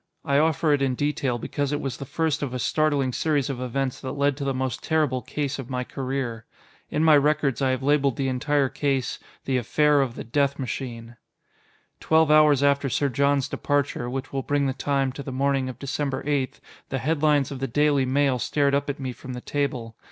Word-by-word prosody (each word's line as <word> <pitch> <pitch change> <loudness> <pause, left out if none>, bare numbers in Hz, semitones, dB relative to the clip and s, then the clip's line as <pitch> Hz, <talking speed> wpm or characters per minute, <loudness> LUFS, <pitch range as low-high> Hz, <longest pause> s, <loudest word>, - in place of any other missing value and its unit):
I 140 0 +3
offer 155 0 +2
it 145 - +1
in 135 -2 +1
detail 140 -3 -1
because 140 +4 -2
it 145 - -1
was 135 -5 -4
the 140 - -6
first 155 +1 -1
of 130 -3 -3
a - - -1
startling 140 -1 +1
series 145 -2 0
of 125 -2 -5
events 130 +1 -2
that 130 0 -4
led 140 0 +1
to 145 - -4
the 140 - 0
most 130 -1 -2
terrible 150 -5 +1
case 145 0 -3
of 130 -1 -7
my 125 -1 -2
career. 130 -3 -4 0.4
In 150 - 0
my 155 -2 +7
records 145 -3 +2
I 135 - +2
have 130 0 -1
labeled 140 -2 +2
the 135 - -1
entire 140 +2 +1
case 135 -2 -1 0.3
"The 130 -1 +1
Affair 145 +4 +3
of 125 -3 -2
the - - -6
Death 140 +4 0
Machine." 120 -2 -5 0.8
Twelve 160 -1 +3
hours 150 -2 +5
after 140 -1 +2
Sir 140 +3 +1
John's 140 +1 +1
departure 145 -4 -1
which 135 +2 -5
will 135 - -1
bring 145 +1 0
the 135 - 0
time, 135 -1 0
to 135 - -7
the 135 - -6
morning 135 0 0
of 130 - -8
December 140 -1 -3
8 140 -3 -1 0.3
the 135 - -1
headlines 145 0 +1
of 135 - -5
the 135 - -2
Daily 145 +2 +2
Mail 135 -1 +2
stared 140 +3 +1
up 140 +1 0
at 145 - -3
me 130 -2 -3
from 130 +1 -9
the 125 - -6
table. 125 -6 -3
140 Hz, 210 wpm, -25 LUFS, 130-145 Hz, 0.8 s, my